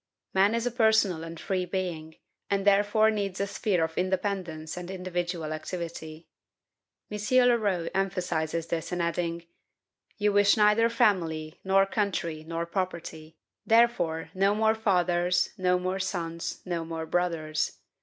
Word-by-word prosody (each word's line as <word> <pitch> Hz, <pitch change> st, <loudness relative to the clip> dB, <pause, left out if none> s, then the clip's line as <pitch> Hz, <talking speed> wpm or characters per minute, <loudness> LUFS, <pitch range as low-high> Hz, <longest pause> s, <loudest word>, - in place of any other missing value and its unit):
Man 195 Hz, +4 st, +4 dB
is 230 Hz, 0 st, -1 dB
a 245 Hz, -, 0 dB
personal 220 Hz, -7 st, +3 dB
and 165 Hz, 0 st, -8 dB
free 185 Hz, -2 st, -1 dB
being, 175 Hz, -4 st, -4 dB, 0.3 s
and 200 Hz, 0 st, 0 dB
therefore 205 Hz, +2 st, +4 dB
needs 200 Hz, -3 st, -3 dB
a 200 Hz, -, +1 dB
sphere 200 Hz, -3 st, 0 dB
of 160 Hz, 0 st, -3 dB
independence 185 Hz, -4 st, -2 dB
and 180 Hz, 0 st, -7 dB
individual 175 Hz, -3 st, -3 dB
activity. 160 Hz, -1 st, -6 dB, 0.8 s
M. 210 Hz, -, -4 dB, 0.3 s
Leroux 205 Hz, -8 st, +1 dB
emphasizes 175 Hz, -4 st, -1 dB
this 165 Hz, -1 st, -3 dB
in 180 Hz, -, -2 dB
adding: 170 Hz, 0 st, -2 dB, 0.7 s
"You 210 Hz, -1 st, +1 dB
wish 205 Hz, +1 st, +5 dB
neither 210 Hz, +2 st, +4 dB
family, 170 Hz, -9 st, 0 dB
nor 195 Hz, 0 st, +4 dB
country, 190 Hz, -6 st, -2 dB
nor 165 Hz, +1 st, -3 dB
property; 170 Hz, -3 st, -5 dB, 0.3 s
therefore 225 Hz, -9 st, +2 dB
no 195 Hz, +2 st, +2 dB
more 220 Hz, 0 st, +3 dB
fathers, 180 Hz, -4 st, +1 dB
no 180 Hz, -1 st, +2 dB
more 185 Hz, +1 st, -2 dB
sons, 170 Hz, -3 st, -4 dB
no 170 Hz, -2 st, -2 dB
more 165 Hz, 0 st, -5 dB
brothers. 160 Hz, -3 st, -1 dB
180 Hz, 135 wpm, -28 LUFS, 165-200 Hz, 0.8 s, wish